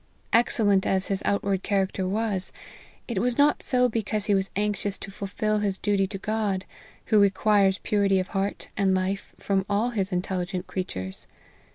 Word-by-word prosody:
Excellent 210 -4 +3
as 190 0 +1
his 195 -1 0
outward 200 -1 +1
character 195 -2 0
was, 205 -1 -1 0.6
it 235 -6 -1
was 240 +3 0
not 290 +1 +4
so 250 -1 +2
because 215 -3 -1
he 210 - +2
was 195 0 +1
anxious 205 -1 -1
to 195 - -8
fulfil 210 +2 -1
his 200 -2 -1
duty 200 -2 +1
to 195 0 -5
God, 205 -2 -1 0.5
who 215 - +7
requires 200 0 +3
purity 200 -2 +2
of 185 - -3
heart 195 +1 -2
and 195 -2 +2
life 190 +1 -2
from 195 -1 0
all 210 +4 +1
his 200 -4 -1
intelligent 180 0 -2
creatures. 95 - -5
200 Hz, 165 wpm, -26 LUFS, 190-210 Hz, 0.6 s, who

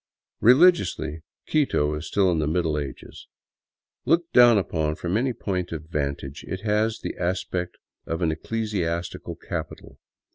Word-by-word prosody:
Religiously, 115 - +4 0.2
Quito 105 - +1
is 75 - -5
still 95 -3 +2
in 85 - 0
the 75 - 0
Middle 80 -1 0
Ages. 70 -2 -8 0.8
Looked 170 +1 +1
down 120 -2 +7
upon 80 -5 -1
from 85 +3 -3
any 130 +4 +1
point 90 -6 -3
of 80 -2 -5
vantage, 70 -2 -3
it 95 - -4
has 110 +1 +1
the - - -4
aspect 90 0 -2 0.3
of 80 +2 -2
an 80 - +2
ecclesiastical 85 -2 -3
capital. - - -7
90 Hz, 140 wpm, -25 LUFS, 80-110 Hz, 0.8 s, down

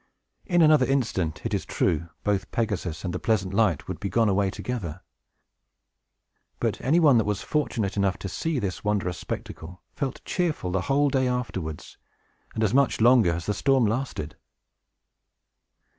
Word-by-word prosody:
In 175 -3 +4
another 155 -4 +5
instant, 110 - -1
it - - -2
is - - 0
true, 85 +1 -1
both 100 -2 0
Pegasus 100 -7 -2
and 90 - -2
the 90 - -3
pleasant 100 -4 0
light 100 -7 +1
would - - -5
be 100 - -3
gone 115 +3 +2
away 100 0 +2
together. 95 -6 -5 1.6
But - - -1
any 155 +7 +3
one 145 -8 +6
that - - +2
was 105 -1 -2
fortunate 110 -10 -1
enough 100 -1 +1
to - - -6
see 160 - -2
this 100 -7 -3
wondrous 100 -4 -1
spectacle 90 +3 -7
felt 135 -3 -4
cheerful 160 - -1
the 95 0 0
whole 140 +4 +2
day 130 -1 +2
afterwards, 95 -11 -4 0.6
and 110 - 0
as 105 - +1
much 140 -1 +3
longer 115 -5 +5
as 85 0 -4
the 105 - 0
storm 135 +3 +2
lasted. 110 - -3
105 Hz, 160 wpm, -26 LUFS, 95-130 Hz, 1.6 s, one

